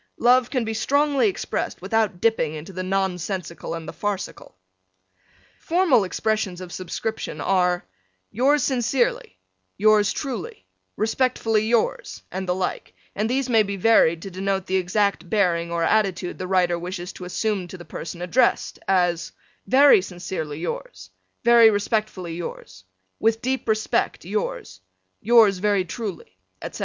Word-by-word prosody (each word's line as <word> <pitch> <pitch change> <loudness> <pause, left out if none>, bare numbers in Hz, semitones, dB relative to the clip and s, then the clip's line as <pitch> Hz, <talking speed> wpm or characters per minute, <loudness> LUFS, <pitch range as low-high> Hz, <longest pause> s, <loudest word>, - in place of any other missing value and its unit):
Love 250 +1 +4
can 250 -4 -1
be 220 - -2
strongly 285 - +2
expressed 385 - -3
without 220 -5 0
dipping 180 -8 +1
into 160 +6 -8
the 185 - -4
nonsensical 185 -2 -3
and 165 -1 -7
the - - -6
farcical. 205 - -5 1.0
Formal 335 - +3
expressions 200 -1 -1
of 180 -1 -9
Subscription 205 +4 -4
are: 180 -2 +1 0.5
Yours 275 +5 +2
Sincerely, 245 - 0 0.4
Yours 215 0 +4
truly, 310 - -5 0.3
Respectfully 225 -1 +1
yours, 230 -1 -1
and 190 0 -4
the 180 - +2
like, 185 -1 -4 0.2
and 215 +2 -1
these 265 +1 0
may 230 -3 +4
be 200 -1 -2
varied 175 -5 +4
to 195 - -7
denote 190 +1 -2
the 190 - -1
exact 185 -1 0
bearing 170 -5 +1
or 170 0 0
attitude 190 -4 0
the 185 - -4
writer 180 -2 +2
wishes 180 +1 -6
to 180 - -9
assume 195 0 -2
to 185 - -9
the 175 - -11
person 170 +3 -7
addressed: 235 +7 +1
as, 175 -3 +1 0.4
Very 270 -1 +6
sincerely 175 -5 -5
yours, 95 - -6 0.3
Very 235 -1 +7
respectfully 205 -4 -2
yours, 95 - -8 0.3
With 225 +1 +1
deep 260 -2 -2
respect 215 -5 0
yours, 180 - -4 0.4
Yours 220 -4 +5
very 200 -1 +1
truly, 180 - -7 0.2
etc. - - -7
195 Hz, 140 wpm, -23 LUFS, 180-225 Hz, 1.0 s, Very